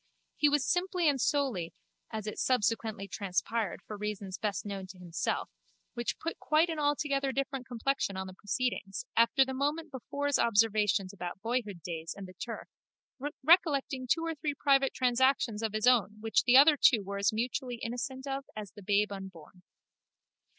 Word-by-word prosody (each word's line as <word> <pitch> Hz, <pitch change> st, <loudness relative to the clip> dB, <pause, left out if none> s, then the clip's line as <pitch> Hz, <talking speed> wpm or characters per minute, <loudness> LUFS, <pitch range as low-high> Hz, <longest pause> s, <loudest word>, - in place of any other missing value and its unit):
He 295 Hz, -, +4 dB
was 290 Hz, -2 st, +2 dB
simply 355 Hz, -1 st, +1 dB
and 275 Hz, -4 st, +2 dB
solely, 250 Hz, -, 0 dB, 0.3 s
as 220 Hz, -2 st, -5 dB
it 210 Hz, -, -5 dB
subsequently 225 Hz, -4 st, 0 dB
transpired 200 Hz, +2 st, -2 dB
for 215 Hz, -, -6 dB
reasons 200 Hz, -2 st, -4 dB
best 210 Hz, -1 st, -2 dB
known 195 Hz, -2 st, -5 dB
to 185 Hz, 0 st, -12 dB
himself, 175 Hz, -2 st, -2 dB, 0.5 s
which 240 Hz, -1 st, -3 dB
put 330 Hz, -, -5 dB
quite 315 Hz, +2 st, +3 dB
an 320 Hz, -, -3 dB
altogether 290 Hz, -2 st, +1 dB
different 270 Hz, -2 st, -3 dB
complexion 245 Hz, -4 st, -1 dB
on 190 Hz, -, -3 dB
the 185 Hz, -, -9 dB
proceedings, 205 Hz, 0 st, -2 dB
after 235 Hz, +4 st, +5 dB
the 265 Hz, -, -4 dB
moment 295 Hz, +4 st, -1 dB
before's 285 Hz, +2 st, -1 dB
observations 210 Hz, -3 st, +2 dB
about 180 Hz, -2 st, -6 dB
boyhood 225 Hz, -7 st, -2 dB
days 165 Hz, -2 st, -5 dB
and 200 Hz, -, -7 dB
the 185 Hz, -, -12 dB
turf, 230 Hz, +5 st, -7 dB, 0.8 s
recollecting 280 Hz, -5 st, +3 dB
two 330 Hz, +6 st, +1 dB
or 330 Hz, -, -1 dB
three 295 Hz, -1 st, -3 dB
private 275 Hz, -1 st, +3 dB
transactions 255 Hz, -3 st, +2 dB
of 220 Hz, -2 st, -2 dB
his 215 Hz, +1 st, 0 dB
own 235 Hz, -5 st, +4 dB
which 225 Hz, +1 st, +1 dB
the 250 Hz, +1 st, +7 dB
other 295 Hz, +2 st, +8 dB
two 230 Hz, -7 st, +6 dB
were 200 Hz, +1 st, -4 dB
as 200 Hz, -, +3 dB
mutually 245 Hz, +3 st, -2 dB
innocent 250 Hz, +3 st, -5 dB
of 275 Hz, 0 st, -3 dB
as 210 Hz, -3 st, -6 dB
the 205 Hz, -, -13 dB
babe 205 Hz, +1 st, +2 dB
unborn. 185 Hz, -3 st, -9 dB
235 Hz, 170 wpm, -31 LUFS, 200-275 Hz, 0.8 s, other